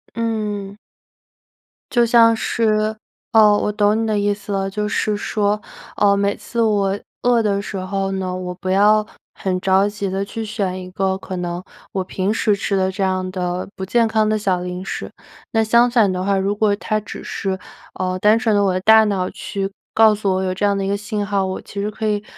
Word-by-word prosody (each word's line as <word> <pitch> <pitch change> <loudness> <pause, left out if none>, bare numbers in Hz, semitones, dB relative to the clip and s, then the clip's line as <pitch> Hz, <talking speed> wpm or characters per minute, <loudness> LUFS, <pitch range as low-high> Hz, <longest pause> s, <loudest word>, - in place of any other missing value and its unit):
嗯。 210 -3 -3 1.1
就 240 -1 +4
像 230 -1 +6
是 215 -1 0 0.4
哦， 210 -2 +6
我 - - 0
懂 210 +1 +2
你 225 - -1
的 215 -1 +1
意 205 0 +1
思 205 0 -7
了， 195 0 -1
就 210 +1 -2
是 210 0 0
说， 210 0 0 0.4
呃， 200 -1 +4
每 200 0 0
次 235 -1 -3
我 200 -3 +2 0.3
饿 240 -2 +3
的 200 -1 +1
时 200 - -7
候 195 +1 -2
呢， 185 -1 -2
我 180 -1 -5
不 185 +1 -5
要 210 +2 +4 0.3
很 185 -1 -2
着 195 +2 +3
急 205 -2 -4
地 195 +1 -1
去 220 +2 -5
选 195 -4 -3
一 180 - -8
个 190 0 0
可 190 - -7
能 175 0 -3 0.3
我 190 - -1
平 190 +3 -1
时 215 -2 +2
吃 195 0 -1
的 190 0 +1
这 190 +1 -3
样 185 -1 0
的 180 -1 -3
不 190 - -6
健 230 +4 +2
康 220 -1 +1
的 215 - +2
小 185 -3 0
零 180 +1 -5
食。 - - -5 0.4
那 225 - +2
相 235 +2 +4
反 225 -5 +4
的 185 0 -2
话， 200 0 +1
如 200 +2 0
果 210 -1 +2
它 215 - -1
只 210 - -9
是， 190 -1 -3 0.4
呃， 185 0 -1
单 215 +3 +4
纯 225 -4 +1
的 205 - +3
我 195 - +2
的 185 - 0
大 220 +3 +6
脑 195 -4 0
去 195 -1 -4 0.2
告 220 -1 +6
诉 200 -2 0
我 190 - 0
有 185 - -1
这 205 +2 -1
样 200 -1 +2
的 195 - -1
一 - - -2
个 200 - +1
信 210 0 -3
号， 200 -2 +1
我 185 - -3
其 200 - -7
实 210 - -2
可 220 +1 -3
以 210 -1 0
200 Hz, 235 characters per minute, -20 LUFS, 190-215 Hz, 1.1 s, 像